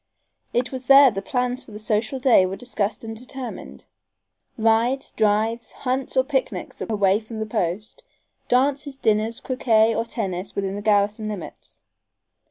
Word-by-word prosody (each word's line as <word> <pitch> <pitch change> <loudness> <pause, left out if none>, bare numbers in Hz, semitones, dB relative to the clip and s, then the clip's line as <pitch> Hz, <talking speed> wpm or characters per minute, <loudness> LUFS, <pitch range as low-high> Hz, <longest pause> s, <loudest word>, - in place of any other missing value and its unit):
It 245 +1 0
was 260 -1 -7
there 275 -1 +8
the 195 - -4
plans 250 +4 -2
for - - -16
the 210 - -8
social 215 +4 -1
day 255 -6 +5
were 190 - -4
discussed 215 -2 -3
and 225 0 -6
determined. 250 +2 -8 0.7
Rides, 230 +4 +1
drives, 220 +2 0
hunts 260 0 -2
or 260 - +5
picnics 265 -1 -3
away 205 -2 +2
from 220 0 -8
the 220 - -2
post; 210 - -3 0.4
dances, 275 +2 +1
dinners, 220 0 +1
croquet 230 -4 +2
or 230 - 0
tennis 195 -5 -4
within 195 -1 -2
the 205 - -5
garrison 210 +1 +1
limits. 200 -6 -9
225 Hz, 150 wpm, -23 LUFS, 210-255 Hz, 0.7 s, there